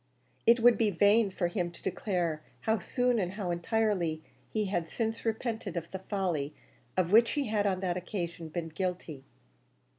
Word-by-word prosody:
It 235 +1 +7
would 240 0 +6
be 220 -2 +4
vain 205 +3 +4
for 185 -2 -1
him 175 -1 -1
to - - -13
declare 175 -5 -1 0.2
how 220 -1 +1
soon 245 +5 +1
and 185 -2 -1
how 190 -3 -2
entirely 175 -3 0 0.3
he 215 -1 0
had 175 -4 -1
since 225 -1 -2
repented 220 -4 -2
of 170 0 -5
the 190 - -4
folly 175 -7 -2 0.4
of 180 -1 +2
which 230 +2 +6
he 285 -6 -1
had 205 -1 +2
on 190 -1 0
that 180 -2 0
occasion 170 -3 -4
been 165 0 -4
guilty. 175 -4 -4
190 Hz, 175 wpm, -30 LUFS, 170-220 Hz, 0.4 s, It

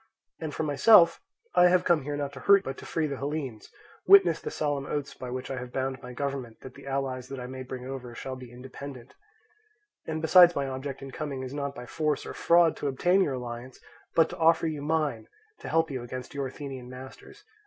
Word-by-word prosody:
And 160 -2 -4
for 160 - -3
myself, 170 +4 +6 0.3
I 180 - +6
have 180 0 +3
come 170 -3 +3
here 145 +2 -4
not 140 -1 -3
to 135 - -9
hurt 200 -1 +5
but 135 - -4
to - - -10
free 160 -2 0
the 140 -2 -3
Hellenes, 140 -6 -4 0.4
witness 180 -4 +7
the - - -4
solemn 145 -2 -2
oaths 145 -1 -3
by 125 - -8
which 130 +2 -5
I 130 - -3
have 125 -1 -8
bound 130 0 -3
my 125 - -9
government 130 -3 -4
that 130 - -10
the - - -13
allies 135 -2 -2
that 135 0 -7
I 125 - -6
may 130 +1 -7
bring 130 -1 -7
over 125 -2 -7
shall 130 +1 -5
be 125 -2 -11
independent; 130 0 -10 0.9
and 160 0 -2
besides 175 +2 +7
my 140 -1 -1
object 135 +1 -5
in 135 - -8
coming 140 -3 -4
is 130 +1 -6
not 140 -1 -3
by 125 - -8
force 150 +2 -1
or - - -6
fraud 170 -1 +4
to 145 - -3
obtain 175 +8 +2
your 140 -8 +1
alliance, 120 0 -7 0.4
but 165 - +5
to 180 - -8
offer 165 0 +4
you 155 -3 -2
mine 155 0 -1 0.3
to - - -7
help 160 -1 +2
you 130 -2 -3
against 125 +1 -7
your 140 -1 -2
Athenian 130 -2 -8
masters. 130 - -12
140 Hz, 220 wpm, -28 LUFS, 130-155 Hz, 0.9 s, witness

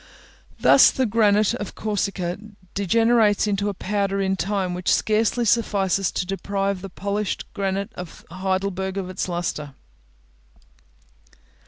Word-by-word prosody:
Thus - - +7
the 260 - 0
granite 210 -2 +3
of 205 - -5
Corsica 200 -4 -2 0.4
degenerates 220 +2 +3
into 205 0 0
a 200 - -4
powder 200 0 -1
in 190 -1 0
a - - +1
time 190 -1 -1
which 180 0 -1
scarcely 225 +2 +2
suffices 195 -4 +1
to - - -1
deprive 195 0 -2
the 195 - -7
polished 200 +2 -3
granite 195 0 -2
of 180 -2 -9
Heidelberg 190 +1 -2
of 185 -1 -3
its 185 - -3
lustre. 155 -5 -3
195 Hz, 130 wpm, -23 LUFS, 185-210 Hz, 0.4 s, Thus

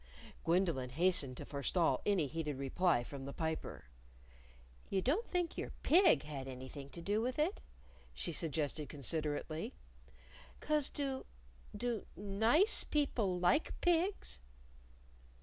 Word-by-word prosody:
Gwendolyn 165 -7 +1
hastened 145 -3 +2
to - - -6
forestall 140 0 +1
any 195 -7 +3
heated 150 -1 -3
reply 140 0 +2
from 135 +2 -8
the 140 - -6
Piper. 160 - -4 1.0
"You 195 - +1
don't 305 - 0
think 355 -2 -1
your - - -3
pig 355 +2 +6
had 140 -3 -6
anything 130 +2 -8
to 170 +3 -9
do 205 +4 +1
with 250 +2 -2
it?" 320 +8 0 0.5
she 170 - -4
suggested 150 -1 -1
considerately. 155 - -2 0.8
"'Cause 300 -2 +2
do 270 -2 -3 0.5
do 235 -4 -2
nice 220 - +4
people 230 -11 0
like 180 - +2
pigs?" 350 - +1
175 Hz, 120 wpm, -36 LUFS, -, 1.0 s, pig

